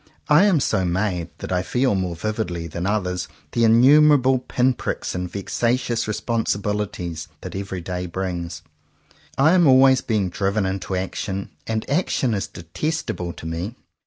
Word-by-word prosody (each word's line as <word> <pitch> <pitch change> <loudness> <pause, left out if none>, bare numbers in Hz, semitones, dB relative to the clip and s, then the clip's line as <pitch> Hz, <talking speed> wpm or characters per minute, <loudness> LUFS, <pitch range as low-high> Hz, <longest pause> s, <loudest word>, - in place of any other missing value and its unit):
I 150 +7 +6
am 190 -7 +4
so 95 -7 +1
made 90 -1 -1
that - - -7
I 90 -1 +1
feel 125 +5 +1
more 95 -3 -1
vividly 90 -3 -3
than 85 +3 -4
others 90 -4 -1 0.2
the 120 - +1
innumerable 130 +3 +6
pin 125 0 +1
pricks - - -4
and 90 -1 -4
vexa 115 +4 0
tious 120 -3 -2
responsibilities 105 -5 -2
that - - -7
every 95 -2 -4
day 90 +1 -4
brings. 85 -3 -4 0.7
I 140 +4 +5
am 175 -4 +5
always 130 0 +6
being 105 -5 0
driven 100 +2 0
into 95 0 -3
action, 95 +1 -3 0.2
and 110 -1 -2
action 140 -5 +1
is 100 - -2
detestable 90 - -4
to - - -11
me. 85 +8 -4
100 Hz, 155 wpm, -22 LUFS, 90-125 Hz, 0.7 s, I